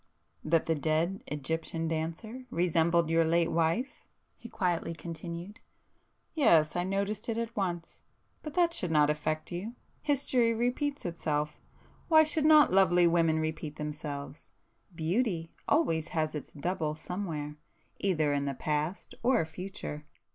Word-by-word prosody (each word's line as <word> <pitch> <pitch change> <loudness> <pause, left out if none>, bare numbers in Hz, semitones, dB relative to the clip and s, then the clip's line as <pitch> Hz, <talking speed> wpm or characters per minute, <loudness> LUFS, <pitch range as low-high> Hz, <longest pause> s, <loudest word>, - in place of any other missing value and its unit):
..." - - -45
"That 160 +1 +2
the 165 - +2
dead 160 +5 0
Egyptian 160 +3 -3
dancer 170 +11 -4
resembled 170 -2 +2
your 165 0 +4
late 170 +1 +2
wife?" 170 +11 0 0.3
he 235 - -11
quietly 175 -2 -1
continued—"Yes,—I 170 - -2
noticed 200 +4 -2
it 225 - -1
at 230 0 -3
once. 175 -4 -3 0.4
But 305 -2 -7
that 345 -1 +3
should 180 - -2
not 150 -2 +4
affect 155 +2 -2
you. 200 +7 -5 0.3
History 255 -5 +2
repeats 255 +4 -1
itself,—why 165 - 0
should 310 0 +1
not 305 -8 +7
lovely 180 -2 +5
women 165 -2 +3
repeat 155 -1 -3
themselves? 150 -1 -6 0.5
Beauty 170 0 -1
always 165 - +2
has 155 -1 +1
its 150 - -6
double 155 0 -2
somewhere, 155 -4 -5 0.4
either 155 -7 +1
in 140 0 0
the 140 -1 -2
past 150 +6 -2
or 240 -7 +3
future." 160 -3 -7
170 Hz, 130 wpm, -30 LUFS, 155-210 Hz, 0.5 s, not